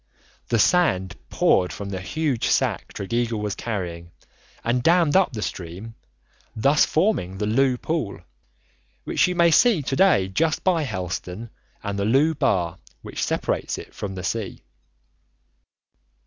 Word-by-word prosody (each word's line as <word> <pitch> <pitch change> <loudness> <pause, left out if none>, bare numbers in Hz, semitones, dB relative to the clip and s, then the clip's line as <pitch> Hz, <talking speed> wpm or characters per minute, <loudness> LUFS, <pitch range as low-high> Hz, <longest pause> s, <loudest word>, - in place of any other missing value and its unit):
The 115 - +2
sand 105 - +2
poured 90 -1 +2
from 100 -1 -6
the 95 -2 -4
huge 145 +3 -1
sack - - 0
Tregeagle 115 +2 -2
was 105 -1 -2
carrying 85 -7 -5 0.5
and 120 +2 +1
dammed 165 +1 +3
up 185 -6 +4
the 105 -2 -3
stream, 95 +6 -6 0.6
thus 140 +7 +3
forming 155 - 0
the 105 - -1
Looe 125 +4 +2
Pool, 125 - -3 0.8
which - - +2
you 180 - -2
may 170 -1 +4
see 205 - +4
to 135 - -2
day 175 - +4
just 155 +12 0
by 180 -3 +2
Helston, 95 - -5 0.3
and 100 0 -3
the 100 - 0
Looe 140 +8 +3
Bar, 90 - 0 0.2
which - - -6
separates - - -1
it - - -10
from 95 -2 -5
the 90 - -6
sea. 110 +1 -3
115 Hz, 145 wpm, -23 LUFS, 95-155 Hz, 0.8 s, up